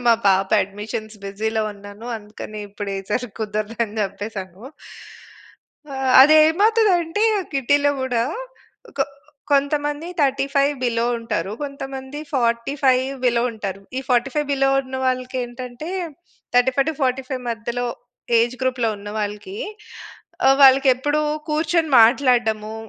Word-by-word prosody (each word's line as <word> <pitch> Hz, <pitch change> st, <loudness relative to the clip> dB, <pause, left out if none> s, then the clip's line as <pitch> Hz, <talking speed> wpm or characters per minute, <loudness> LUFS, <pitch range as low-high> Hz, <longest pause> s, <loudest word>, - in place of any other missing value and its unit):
మా 235 Hz, -, +7 dB
పాప 190 Hz, 0 st, +2 dB
అడ్మిషన్స్ 210 Hz, +2 st, -7 dB
బిజీలో 220 Hz, +2 st, -2 dB
ఉన్నాను 205 Hz, +3 st, -11 dB
అందుకని 210 Hz, 0 st, -9 dB
ఇప్పుడు 205 Hz, 0 st, -6 dB
ఈ -, -, -4 dB
సారి 245 Hz, +2 st, -1 dB
కుదరదు, 215 Hz, +1 st, -3 dB
అని 215 Hz, 0 st, -8 dB
చెప్పేసాను. 195 Hz, -1 st, -6 dB, 1.6 s
అది 305 Hz, +3 st, +6 dB
ఏమవుతది 425 Hz, +5 st, +3 dB
అంటే 340 Hz, +6 st, -2 dB, 0.3 s
కిట్టీలో 285 Hz, +2 st, +2 dB
కూడా 245 Hz, -3 st, 0 dB, 0.8 s
కొ -, -, +4 dB, 0.5 s
కొంతమంది 290 Hz, +3 st, 0 dB
35 275 Hz, +1 st, +2 dB
బిలో 230 Hz, -1 st, +1 dB
ఉంటారు. 215 Hz, -3 st, -3 dB
కొంతమంది 270 Hz, 0 st, -6 dB, 0.2 s
45 255 Hz, +2 st, +1 dB, 0.2 s
బిలో 235 Hz, -1 st, +3 dB
ఉంటారు. 195 Hz, -3 st, -5 dB, 0.2 s
ఈ -, -, -1 dB
45 270 Hz, +4 st, +1 dB
బిలో 270 Hz, -1 st, +2 dB
ఉన్న 260 Hz, 0 st, -7 dB
వాళ్ళకి 255 Hz, 0 st, -1 dB
ఏంటంటే 245 Hz, +4 st, -8 dB, 0.7 s
35-45 260 Hz, 0 st, +1 dB
మధ్యలో 235 Hz, +2 st, -3 dB, 0.5 s
ఏజ్ 235 Hz, +2 st, +1 dB
గ్రూప్‌లో 255 Hz, -3 st, +1 dB
ఉన్నవాళ్ళకి 210 Hz, -, -5 dB, 0.9 s
ఆహ్, 270 Hz, 0 st, +6 dB
వాళ్ళకి 270 Hz, +1 st, +7 dB
ఎప్పుడు 290 Hz, +3 st, 0 dB, 0.3 s
కూర్చొని 315 Hz, +1 st, +1 dB
మాట్లాడడము. 225 Hz, -3 st, +2 dB
250 Hz, 110 wpm, -21 LUFS, 215-275 Hz, 1.6 s, మా